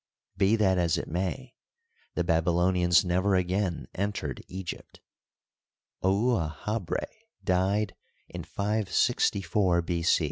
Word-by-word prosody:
Be 100 +3 +3
that 95 -4 +2
as 85 -2 +2
it - - -4
may, 95 +10 -3 0.6
the - - +1
Baby 85 -1 +1
lonians 90 0 +3
never 95 +3 +2
again 90 0 -1
entered 100 -9 -3
Egypt. 95 -1 -7 1.0
Ouahabra 95 -1 0 0.4
died 95 +2 +1 0.3
in - - -7
564 100 -3 +1
B. 85 0 -2
95 Hz, 100 wpm, -28 LUFS, 85-100 Hz, 1.0 s, Be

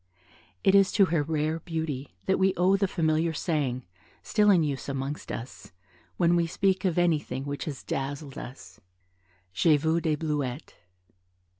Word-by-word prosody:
It 195 - +4
is 195 -1 +5
to 200 - +5
her 160 - +3
rare 155 +1 -1
beauty 160 - -4
that 190 - +1
we 190 0 +3
owe 185 +2 +4
the 195 0 +1
familiar 160 -2 +1
saying, 145 -7 -1 0.4
still 210 -2 +3
in 180 -5 +5
use 140 -2 -3
amongst 135 +2 -4
us, 115 -5 -8 0.4
when 175 -1 +3
we 170 -1 +2
speak 190 +3 0
of 180 -3 +1
anything 150 -6 0
which 145 0 -4
has 145 -4 -6
dazzled 140 +1 -4
us, 95 -8 -10 0.7
"J'ai 150 - +4
vu 160 +3 +1
des 155 -2 +1
Bleuettes." 145 -3 -3
155 Hz, 155 wpm, -27 LUFS, 140-175 Hz, 0.7 s, is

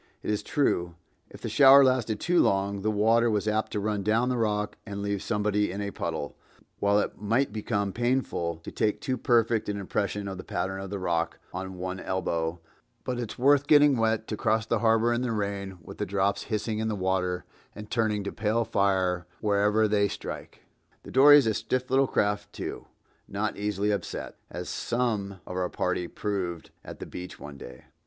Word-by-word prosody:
It - - -1
is 105 - 0
true, 90 - 0 0.3
if - - -13
the - - -4
shower 140 0 +8
lasted 120 -5 +1
too 175 0 +2
long, 100 0 +1
the 110 - 0
water 115 +3 +3
was 105 -1 0
apt 110 +1 0
to 105 - 0
run 105 0 -1
down 110 +5 +2
the 125 - 0
rock 105 -2 0
and 100 -2 -6
leave 100 -1 -1
somebody 105 -2 0
in 100 - -5
a 100 0 -3
puddle, 80 -6 -4 0.4
while 100 0 +3
it - - -3
might 115 +3 +1
become 100 -2 -1
painful 120 -9 0
to - - -7
take 110 -2 0
too 130 - -1
perfect 115 -4 +2
an 100 - -2
impression 100 +1 -2
of 95 -1 -5
the - - -6
pattern 95 +1 -3
of 95 - -6
the 100 - -3
rock 85 -3 -1 0.2
on 95 +1 -5
one 90 +1 -4
elbow, 85 -3 -2 0.4
but 125 -1 -3
it's 120 -3 -5
worth 140 +2 +4
getting 145 -2 +6
wet 110 -1 +1
to 110 - -1
cross 110 +1 +1
the 115 - 0
harbor 115 +1 +3
in 120 - 0
the 125 -2 -1
rain 100 -3 -3
with - - -11
the - - 0
drops 100 +1 0
hissing 110 0 -2
in 110 - -1
the 110 - -1
water 95 -1 -1 0.3
and 105 0 -9
turning 110 -3 +1
to 100 - -4
pale 110 +2 0
fire 95 -4 +1
wherever 105 +1 +2
they 100 -1 +2
strike. - - -7 0.4
The - - -10
dory 145 +3 +8
is 140 - +4
a 110 - +2
stiff 125 +5 -2
little 135 0 +4
craft, 105 -3 0
too, - - -6 0.4
not 105 +2 -2
easily 105 0 -1
upset, 100 - -4
as - - -6
some 105 -6 -2
of 90 - -7
our 90 -1 -1
party 90 -1 -1
proved 90 -6 -4
at - - -9
the - - -6
beach 90 0 -8
one 70 -2 -9
day. 65 +1 -11
105 Hz, 200 wpm, -27 LUFS, 95-115 Hz, 0.4 s, shower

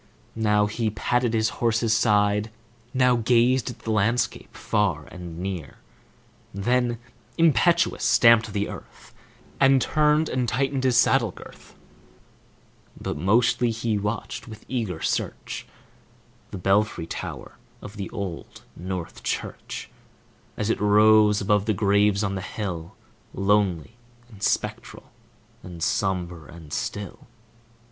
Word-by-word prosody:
Now 105 -2 +2
he 110 +2 -1
patted 120 +3 0
his 110 0 +2
horse's 115 -1 +2
side, 105 -2 +2 0.4
Now 125 -1 +3
gazed 120 +2 +2
at - - -8
the 110 - -3
landscape 110 +3 0
far 100 -8 0
and 85 -2 -9
near, 90 -5 -5 0.8
Then, 120 +4 +1 0.4
impetuous, 165 +1 +3
stamped 115 -2 +5
the 100 0 -1
earth, - - -11 0.5
And 135 0 +5
turned 150 +3 +2
and 125 -2 -1
tightened 135 +2 -1
his 125 -2 +3
saddle 125 -2 +4
girth; - - -14 1.2
But - - -4
mostly 115 +8 +2
he 115 -2 -1
watched 105 +4 -4
with 110 -1 -11
eager 110 -10 -3
search - - -3 0.8
The - - -7
belfry 100 -1 +1
tower - - -7 0.2
of 105 +1 -10
the 100 -2 -5
Old 100 -7 -7
North 90 -1 -6
Church, - - -5 0.7
As 105 +1 0
it - - -2
rose 105 0 +5
above 105 0 +2
the 110 - +1
graves 100 0 +2
on 100 -1 -1
the 95 - -3
hill, 90 -4 -5 0.4
Lonely 100 0 +1 0.3
and 105 -4 -15
spectral - - -2 0.5
and 85 -2 -8
sombre 90 -5 -2
and 80 -3 -11
still. 100 -2 -5
105 Hz, 125 wpm, -24 LUFS, 95-120 Hz, 1.2 s, stamped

